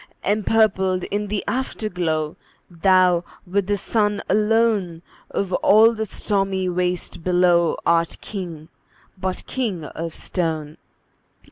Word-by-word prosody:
Empurpled 195 -3 +2
in 210 +1 -1
the 205 0 -2
Afterglow, 180 -11 -2 0.4
Thou, 180 0 +3 0.2
with 190 +1 -1
the 205 0 +1
Sun 210 +1 0
alone, 210 -5 +1 0.3
Of 190 -2 -2
all 220 +5 +5
the 220 -1 -3
stormy 195 -2 -1
waste 180 -1 -2
below, 175 -2 +3
Art 170 0 +2
King, 170 -6 -7 0.5
but 185 -1 -4
king 215 -11 -3
of 165 +2 -6
stone! 160 -4 -3
185 Hz, 110 wpm, -22 LUFS, 170-210 Hz, 0.5 s, all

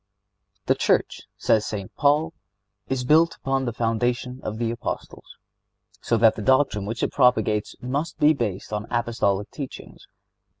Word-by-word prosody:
The - - +4
Church, - - 0
says 110 -2 +2
St. 100 -4 -5
Paul, 150 +3 +2 0.5
is 130 -1 -1
"built 160 +5 +4
upon 135 0 -1
the 120 - -1
foundation 120 +3 -1
of 110 - -5
the 115 0 -1
Apostles,"(70) 115 - -9
so 115 - +3
that 110 0 +5
the - - -6
doctrine 130 -5 +2
which 115 +2 -3
it - - 0
propagates 110 -5 +2
must 145 +6 -3
be 150 +1 +5
based 105 -7 -4
on 105 +1 -3
Apostolic 115 -4 0
teachings. 140 -4 -9
120 Hz, 145 wpm, -24 LUFS, 110-135 Hz, 0.5 s, that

